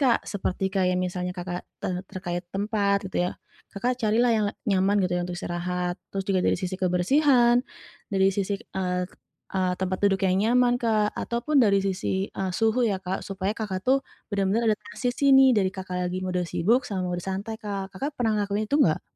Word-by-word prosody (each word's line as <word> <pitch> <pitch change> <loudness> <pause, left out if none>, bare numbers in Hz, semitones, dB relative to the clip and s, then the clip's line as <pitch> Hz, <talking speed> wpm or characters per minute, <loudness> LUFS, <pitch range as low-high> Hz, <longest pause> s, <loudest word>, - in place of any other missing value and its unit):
Kak 255 -4 +2
seperti 195 -1 -2
kayak 185 -2 +2
misalnya 180 0 -3
Kakak, 175 0 -4 0.2
eee, 180 -1 -1
terkait 175 -1 -4
tempat 200 0 +1
gitu 190 - -6
ya. - - -2 0.4
Kakak 245 +5 0
carilah 225 +3 +3
yang 215 -1 +2
la - - -5 0.2
nyaman 195 +1 +3
gitu 180 - -1
ya - - 0
untuk 175 0 -5
istirahat, 180 +1 -2 0.2
terus 195 -1 -3
juga 190 -2 +2
dari - - +3
sisi 185 0 -3
kebersihan, 240 - +4 0.5
dari 190 -1 +4
sisi, 200 0 -1
eee 180 -1 -2 0.5
eee, 185 -1 +1
tempat 185 0 -1
duduk 195 -1 +3
yang 185 - +2
nyaman 245 +2 +4
Kak, 215 -2 +2
ataupun 240 +6 -1
dari 200 -3 +4
sisi, 190 0 -1
eee, 190 -1 -2
suhu 225 +4 +2
ya 200 -3 0
Kak, 185 +1 -3
supaya 195 0 -2
Kakak 200 -4 -3
tuh 265 +2 +5 0.3
bener-bener 205 +3 +2
adaptasi 245 +3 -5
sih 280 - +2
nih 265 0 +7
dari 190 -1 +2
Kakak 185 -1 -5
lagi 185 - -3
mode 180 -1 -1
sibuk, 230 +12 +2
sama 185 -3 -2
mode 175 -1 -3
santai 200 +4 -4
Kak. 195 -2 -4
Kakak 275 +10 -3
pernah 225 -3 +2
ngelakuin 205 +1 -1
itu 285 - +2
nggak? 160 - +3
195 Hz, 190 wpm, -26 LUFS, 185-220 Hz, 0.5 s, nih